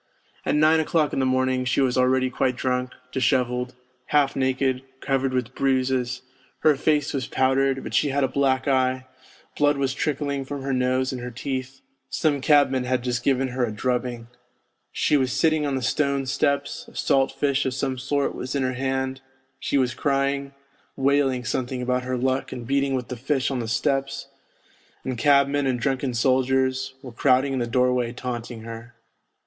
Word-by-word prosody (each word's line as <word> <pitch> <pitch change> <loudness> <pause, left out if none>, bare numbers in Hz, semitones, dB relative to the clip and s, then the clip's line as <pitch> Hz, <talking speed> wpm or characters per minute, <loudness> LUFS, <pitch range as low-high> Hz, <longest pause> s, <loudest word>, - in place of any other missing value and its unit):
At - - +2
nine 155 +2 +5
o'clock 155 -1 +1
in - - 0
the 130 - +2
morning 130 0 +1
she 125 - 0
was 130 -2 +2
already 130 0 +2
quite 125 0 0
drunk, 125 0 -1 0.2
dishevelled, 125 0 0 0.3
half 145 -2 +2
naked, 130 -1 0 0.2
covered 135 -1 0
with 125 -1 -2
bruises, 130 -2 0 0.4
her 155 -2 +5
face 150 +1 +1
was 130 -4 -2
powdered, 135 0 +1
but - - -7
she 145 - +3
had 140 +1 +1
a - - +3
black 130 0 +1
eye, 130 -1 +1 0.5
blood 145 -1 +3
was 135 -1 0
trickling 140 -1 -2
from 140 0 -6
her 135 0 -1
nose 130 0 +1
and 125 - -5
her 125 - -5
teeth; 130 +2 -5 0.3
some 145 -3 0
cabman 140 -3 +4
had 125 -1 0
just 120 -1 -1
given 135 -1 +1
her 125 0 -1
a 115 - 0
drubbing. 120 +1 -2 0.7
She 150 - +2
was 130 -2 0
sitting 155 -2 +2
on 140 - -1
the 130 - -2
stone 140 0 0
steps, 140 +2 -1
a - - -16
salt 135 0 +2
fish 140 -1 0
of 130 - -2
some 130 -1 -2
sort 140 +2 0
was 130 +3 -5
in 140 - +1
her 130 0 0
hand; 130 +1 -2 0.4
she - - 0
was 130 -2 +1
crying, 140 0 -1 0.4
wailing 135 -2 +1
something 130 +2 -2
about 125 0 0
her 130 0 -1
luck 130 +1 -1
and 120 - -6
beating 140 +1 +1
with 125 -2 -4
the 125 - -4
fish 135 +2 0
on 130 - -1
the 115 - -3
steps, 135 +4 -1 0.7
and 130 -3 -4
cabmen 140 0 +3
and 125 -2 0
drunken 135 -1 -1
soldiers 130 +1 +1
were 130 - -8
crowding 130 +3 +2
in 130 - -1
the 120 - -1
doorway 125 0 +1
taunting 120 -2 -5
her. 115 +1 -9
130 Hz, 180 wpm, -24 LUFS, 125-140 Hz, 0.7 s, nine